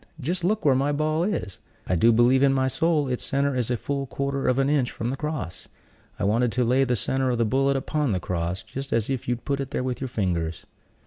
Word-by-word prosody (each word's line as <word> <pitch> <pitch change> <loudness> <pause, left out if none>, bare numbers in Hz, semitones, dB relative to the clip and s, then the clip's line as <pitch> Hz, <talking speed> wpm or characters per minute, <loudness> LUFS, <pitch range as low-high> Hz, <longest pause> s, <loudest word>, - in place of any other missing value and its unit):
Just 170 +5 -2
look 210 +2 0
where 140 - +6
my 135 +3 +1
ball 155 +2 0
is! 180 - -3 0.3
I 90 - 0
do 115 +8 +5
believe 120 +3 +4
in 140 -1 +4
my 130 0 +2
soul 150 +2 +1
its 125 -1 -2
center 140 0 0
is 125 -2 -1
a 125 - 0
full 140 +3 -3
quarter 140 +1 -2
of 125 - +2
an 135 0 +2
inch 140 -4 +2
from 120 +2 -3
the - - -2
cross. 150 - -5 0.5
I - - -4
wanted 115 +4 +2
to 125 - +1
lay 125 +3 +3
the 125 -1 +1
center 130 +4 0
of 120 - 0
the 115 - +2
bullet 135 +4 +2
upon 145 0 -1
the 95 - 0
cross, 90 +1 -3
just 135 +5 -7
as 115 +2 0
if 130 -3 -3
you'd 120 -1 -2
put 140 -1 -1
it 135 -1 -3
there 125 - -2
with 130 -1 -3
your 130 - -2
fingers." 85 -8 -2
130 Hz, 250 wpm, -25 LUFS, 115-140 Hz, 0.5 s, where